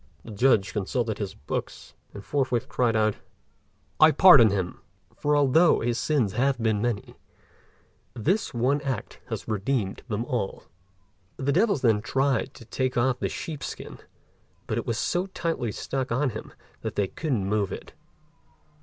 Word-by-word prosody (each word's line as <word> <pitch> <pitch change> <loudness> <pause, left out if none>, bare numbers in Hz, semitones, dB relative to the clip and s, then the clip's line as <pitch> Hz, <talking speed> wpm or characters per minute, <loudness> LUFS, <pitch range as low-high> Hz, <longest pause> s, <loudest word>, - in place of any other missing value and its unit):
The 115 - -10
Judge 105 -4 +2
consulted 110 +2 -2
his 100 -1 -4
books, 75 - -6 0.2
and 100 - -10
forthwith 130 -5 0
cried 120 -2 +1
out, 110 -1 +2 0.8
"I 155 - +8
pardon 155 - +8
him; 95 -3 -3 0.3
for 150 0 +1
although 145 +4 +4
his 120 0 0
sins 130 -11 +1
have 135 +1 +1
been 110 -3 0
many, 120 -4 -2 1.0
this 185 - 0
one 130 +3 +1
act 135 -6 -4
has - - -5
redeemed 105 -1 -1
them 115 0 -2
all." 120 -6 -3 0.7
The 135 +1 0
devils 195 - +2
then 110 -4 +3
tried 135 +2 0
to 115 - -12
take 130 +2 -2
off 125 +1 +2
the - - -1
sheep's 140 +2 -5
skin, - - -8 0.7
but 110 - -1
it - - -6
was 115 -2 -1
so 180 +8 0
tightly 165 - -2
stuck 130 +4 -3
on 130 +2 +1
him 110 - -8 0.3
that - - -4
they 100 - +1
couldn't 125 - -2
move 100 -1 0
it. - - -8
120 Hz, 155 wpm, -26 LUFS, 110-140 Hz, 1.0 s, I